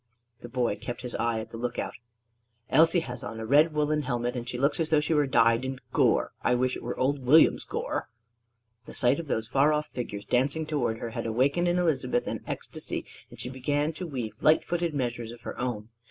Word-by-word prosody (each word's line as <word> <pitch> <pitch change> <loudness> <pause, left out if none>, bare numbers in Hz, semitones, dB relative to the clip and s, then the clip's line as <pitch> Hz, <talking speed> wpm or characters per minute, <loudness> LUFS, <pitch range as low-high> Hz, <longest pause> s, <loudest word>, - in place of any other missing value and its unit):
The 120 - -9
boy 120 -4 0
kept 120 +3 -6
his 125 - -5
eye 115 -1 0
at 110 +1 -10
the 115 - -7
lookout. 125 0 -3 0.8
"Elsie 165 +4 +5
has 125 -5 -6
on 110 +2 -6
a 110 - -4
red 150 +7 +5
woollen 150 0 +1
helmet; 120 -2 -2
and 120 0 -4
she 125 - -3
looks 140 +6 +1
as 160 -1 0
though 155 - +4
she 150 +2 0
were 150 -2 +3
dyed 115 -1 +4
in 130 0 -4
gore. - - +3
I 125 - +2
wish 130 +1 +1
it - - -7
were - - -4
old 135 +1 0
William's 150 +6 +5
gore!" - - -3 0.8
The - - -10
sight 125 +5 +2
of 165 - -6
those 110 -5 -1
far 140 +5 +3
off 150 0 -1
figures 105 -5 -5
dancing 140 +6 +1
toward 145 -7 -1
her 115 0 -5
had 115 0 -3
awaked 130 +7 +2
in 175 0 +2
Elizabeth 160 -8 +1
an - - -4
ecstasy, - - -5 0.2
and - - -14
she 125 - -4
began 145 +4 -1
to 180 +3 -6
weave 125 -7 -5
light 155 +1 +5
footed 170 -2 -1
measures 120 -3 -2
of 120 0 -10
her - - -6
own. 120 -3 -3
130 Hz, 220 wpm, -28 LUFS, 120-150 Hz, 0.8 s, Elsie